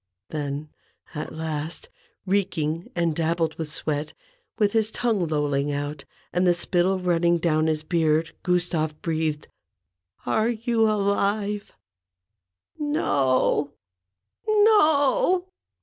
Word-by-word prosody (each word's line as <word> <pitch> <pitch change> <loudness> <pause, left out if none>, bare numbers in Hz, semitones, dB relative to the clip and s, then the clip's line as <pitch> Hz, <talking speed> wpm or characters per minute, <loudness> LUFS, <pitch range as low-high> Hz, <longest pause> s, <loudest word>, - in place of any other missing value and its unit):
Then, 145 0 -4 0.4
at 150 - -5
last, 160 0 -4 0.4
reeking 175 -4 -1
and 170 -2 +1
dabbled 165 0 0
with 155 -2 -4
sweat, 150 -1 -2 0.4
with 205 -3 +2
his 220 -1 +2
tongue 220 -6 0
lolling 145 -2 0
out, 145 0 -4 0.3
and 180 +1 +2
the 175 - +4
spittle 180 +2 +1
running 175 -1 +2
down 160 -2 +1
his 155 -1 0
beard, 160 -1 +1
Gustave 175 -4 0
breathed: 155 -2 -1 0.3
— 90 -1 -58
" 90 +1 -36
Are 220 - +2
you 230 -1 +1
alive? 205 0 0 0.6
" 95 -3 -42
"No, 145 - +1 0.7
no 370 -5 +4
165 Hz, 115 wpm, -25 LUFS, 150-200 Hz, 0.7 s, the